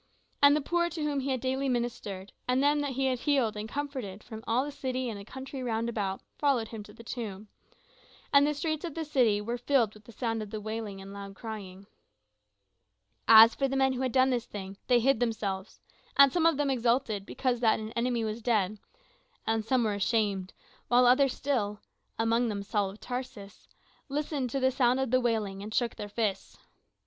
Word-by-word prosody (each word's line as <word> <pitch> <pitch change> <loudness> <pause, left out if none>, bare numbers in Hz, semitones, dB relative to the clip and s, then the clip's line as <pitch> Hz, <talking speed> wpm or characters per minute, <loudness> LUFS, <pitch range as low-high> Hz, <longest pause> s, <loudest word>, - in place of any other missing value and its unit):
And 285 0 +7
the 300 - +1
poor 345 +4 +1
to 325 -2 -4
whom 290 -2 0
he 270 +1 -3
had 260 -1 0
daily 265 +1 0
ministered, 220 -6 -3
and 255 +2 +2
them 295 +1 +3
that 285 -2 -2
he 270 +1 0
had 255 -2 +1
healed 265 -6 +1
and 210 +1 -5
comforted 260 -9 -5
from 220 -2 -9
all 245 +4 +2
the 290 - -5
city 255 -3 -3
and 205 - -7
the - - -8
country 265 +4 -7
round 230 -2 -1
about 200 -4 -2 0.2
followed 265 -6 +2
him 225 -2 -7
to 210 - -14
the 230 - -13
tomb; 210 -3 -6 0.8
and 285 +1 +6
the 300 - 0
streets 310 +1 -2
of 335 -4 -5
the 325 -1 -3
city 245 -8 +3
were 235 +3 -3
filled 245 -4 +2
with 215 -1 -17
the - - -12
sound 225 -1 -2
of 210 - -6
the 215 - -5
wailing 215 -2 -5
and 195 +1 -10
loud 200 -1 -8
crying. 200 -3 -8 1.4
As 225 +1 +10
for 275 - 0
the 270 - -3
men 265 0 +3
which 255 - -3
had 255 - -1
done 260 +1 +4
this 245 -1 -1
thing, 195 -1 -7
they 245 -1 +5
hid 260 0 +3
themselves; 210 -5 -2 0.4
and 280 -1 +7
some 330 -2 +4
of 330 -4 +3
them 290 -2 +1
exulted 235 -4 +1
because 245 +3 -1
that 225 -2 +3
an 215 0 -6
enemy 235 -1 0
was 220 +1 -3
dead, 215 -3 +1 0.7
and 225 0 0
some 245 +2 +2
were 215 -2 +1
ashamed, 200 -2 0 0.4
while 245 +1 +5
others 255 +2 +5
still 210 -7 -1 0.4
amongst 230 +1 +2
them 200 -2 -3
Saul 205 -1 0
of 200 +3 -11
Tarsus 245 -6 -7 0.4
listened 285 -2 -2
to 275 - -1
the 260 0 +3
sound 255 0 +2
of 265 -3 -1
the 255 0 +4
wailing, 215 -5 -1
and 210 +2 -7
shook 235 0 0
their 205 - -6
fists. 205 -3 -2
235 Hz, 210 wpm, -29 LUFS, 215-265 Hz, 1.4 s, As